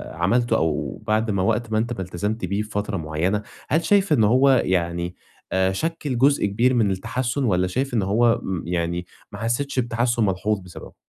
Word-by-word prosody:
عملته 115 +9 +2
أو 80 +5 -2
بعد 110 +1 +1
ما 95 -2 0
وقت 110 +1 0
ما 110 - +1
أنت 115 +2 0
ما 95 - -5
التزمت 105 +5 -3
بيه 100 +2 -1
بفترة 105 -2 -3
معينة، 80 +6 -1 0.3
هل 160 +5 +2
شايف 200 -5 +3
إنه 110 -7 +4
هو 130 +5 +4 0.2
يعني 85 -1 -1 0.4
آآ، 95 0 +2
شكِّل 145 +3 -2
جزء 140 +1 +3
كبير 115 +6 +2
من 110 -5 +2
التحسّن، 120 +7 -2
والّا 90 -5 +2
شايف 130 +7 -2
إن 110 - +2
هو 115 +4 +2 0.2
يعني 85 0 -2 0.3
ما 100 - -8
حسيتش 125 +4 -1
بتحسّن 120 -1 +1
ملحوظ 100 +2 0
بسببه؟ 90 -2 -11
105 Hz, 180 wpm, -23 LUFS, 95-120 Hz, 0.4 s, إنه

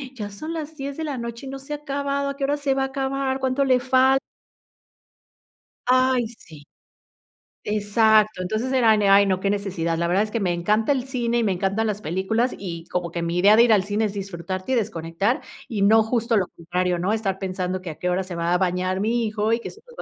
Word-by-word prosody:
ya 210 -3 -5
son 310 +12 -6
las 315 -1 -5
10 280 0 -6
de 320 - -3
la 290 -4 -3
noche 235 +2 -6
y - - -6
no 270 0 -6
se 285 +2 -7
ha - - -2
acabado, 280 -1 -2
¿a 280 - -4
qué 280 - -5
hora 290 +2 +1
se 280 -2 0
va 270 - 0
a - - +1
acabar? 270 0 -2
¿Cuánto 265 +1 +1
le 255 -2 +3
falt? 260 +1 +3 1.7
Ay, 255 -2 +3
sí. 160 -10 -13 1.0
Exacto. 215 -1 +3
Entonces, 220 +7 -2
era 230 -5 +4
de: 205 -1 +2
"Ay, 200 +1 +7
no, 185 -1 +1
qué 200 - 0
necesidad". 185 -5 -1
La 170 +1 0
verdad 190 +4 +2
es 215 - -6
que 230 - -1
me 180 -3 0
encanta 210 +9 +1
el 260 - -2
cine 240 -3 -1
y - - +1
me 205 - +1
encantan 195 +4 0
las 210 -1 -3
películas, 210 +8 -1
y 170 -4 -6
como 175 -2 -3
que 170 - -3
mi 170 +1 -2
idea 205 +3 +6
de 235 - +8
ir 235 -2 +5
al 195 - +3
cine 210 +3 0
es 200 - -3
disfrutarte 185 +1 -5
y 260 - +3
desconectar, 195 +1 -1 0.3
y 215 -4 -3
no 220 +3 +6
justo 230 0 0
lo 185 -3 +1
contrario, 180 +1 -2
¿no? 185 +4 0
Estar 210 -4 -1
pensando 185 -1 -3
que 180 - -7
a 155 - -6
qué 180 - -1
hora 185 +2 0
se 180 -1 -7
va 170 +1 0
a - - +4
bañar 185 +1 0
mi 230 +2 +1
hijo 215 0 -1
y 230 - +2
que - - -7
se 435 - -17
nos - - -17
va - - -7
215 Hz, 245 wpm, -23 LUFS, 185-255 Hz, 1.7 s, de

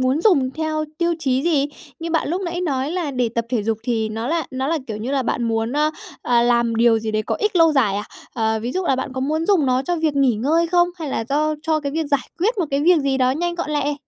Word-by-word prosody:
muốn 260 +4 +1
dùng 305 -11 +3
theo 310 +1 -2
tiêu 340 0 +1
chí 265 -3 0
gì? 295 -4 +2 0.3
Như 330 0 -5
bạn 325 -3 0
lúc 355 +4 -1
nãy 350 -1 -3
nói 280 -4 -1
là 345 -4 -2
để 250 -3 0
tập 235 - 0
thể 235 -4 0
dục 220 0 -1
thì 225 -2 -1
nó 225 +2 -4
là 330 -1 0
nó 260 +1 -2
là, 330 -1 +1
kiểu 215 -2 -4
như 225 +5 -4
là, 275 - +1
bạn 245 0 -1
muốn, 225 0 -1
ơ, 300 +2 +2 0.3
ờ, 240 -1 +3
làm 235 -1 +2
điều 230 0 +4
gì 220 0 -3
đấy 215 0 0
có - - -2
ích 420 -3 -1
lâu 330 -1 +5
dài 225 -9 +2
à? 205 - -3 0.3
Ờ, 220 -2 0
ví 245 - -3
dụ 370 +3 -1
là 265 - +2
bạn 260 0 -4
có 260 - -4
muốn 310 +5 -1
dùng 370 -9 +3
nó 255 0 +2
cho 345 +5 -1
việc 315 -3 0
nghỉ 270 -4 +3
ngơi 310 +10 +1
không? 350 +1 +3
Hay 315 -3 -4
là 225 - -2
do 305 +2 +1
cho 315 -1 +1
cái 280 -1 -4
việc 320 0 -1
giải 280 -3 0
quyết 430 +6 +1
một 350 - +1
cái 275 0 +1
việc 340 +3 +5
gì 275 -1 0
đó 255 -1 +3
nhanh 345 +6 -1
gọn 345 -3 -4
lẹ? 295 -1 0
280 Hz, 285 wpm, -21 LUFS, 240-325 Hz, 0.3 s, lâu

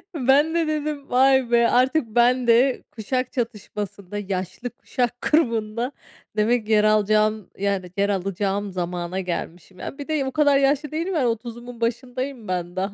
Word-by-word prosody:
ben 285 +3 +3
de 330 -2 +1
dedim, 300 -2 -3
"Vay 265 -1 +4
be, 235 0 +5
artık 255 +1 +2
ben 240 +2 +3
de 245 +3 +4
kuşak 255 +3 -2
çatışmasında, 210 -5 -5
yaşlı 190 +3 -4
kuşak 245 0 -3
grubunda 235 -5 +1 0.5
demek 225 +2 +2
ki 220 - -4
yer 210 -1 +5
alacağım, 215 -1 +2
yani, 195 -3 -1
yer 200 +1 +2
alacağım 195 +1 -1
zamana 175 0 -3
gelmişim." 180 0 -5
Ya, - - -6
bir 285 - -7
de 305 -3 0
o 265 - -3
kadar 285 -1 +4
yaşlı 280 +1 +1
değilim, 335 +5 -2
yani, 270 -6 +2
30’umun 235 +1 -5
başındayım 250 +1 -3
ben 175 -1 -3
daha, 195 +2 -2
235 Hz, 160 wpm, -23 LUFS, 200-265 Hz, 0.5 s, be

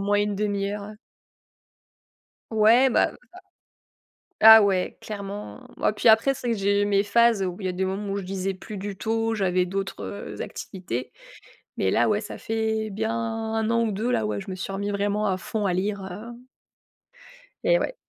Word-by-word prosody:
moins, 205 +1 +1
1/2 205 -1 -1
heure 205 0 -5
ouais. 215 - -10 1.6
Ouais, 230 +4 +5
bah, - - +3 1.3
ça 220 0 +11
ah, - - +6
ouais, 190 -2 0
clairement! 205 +4 -7
Bah, - - +2
puis 210 - 0
après, 225 +5 +5
c'est 245 -2 -3
que 230 - -1
j'ai 200 +1 +2
mes 200 0 +2
phases 230 -1 +3
où 180 -1 -3
il 190 - -3
y 180 - -2
des 185 +1 -2
moments 195 +2 -3
où 200 - -2
je 200 - -4
lisais 190 +1 -3
plus 205 +3 -9
du 195 0 -6
tout. 225 +1 -1
J'avais 185 -3 +1
d'autres, 195 +2 -4
heu, 200 - -6
activités, 130 -10 -6 0.7
mais 95 - +1
là, - - +3
ouais, 210 0 +1
ça 210 - -7
fait 220 -1 -2
bien 220 +2 -2
1 225 -1 -2
an 230 0 +2
ou 220 - -1
2, 215 +5 -2
là, 110 - +1
ouais, 105 -1 -2
je - - -10
me 185 - -4
suis 190 +1 -5
remis 200 +1 -3
vraiment 205 +1 0
à 190 -2 0
fond 210 +2 -3
à 185 - +1
lire, 200 +2 -1
heu 235 +6 -9 1.2
Eh - - +4
ouais. - - -2
205 Hz, 190 wpm, -25 LUFS, 195-220 Hz, 1.6 s, ça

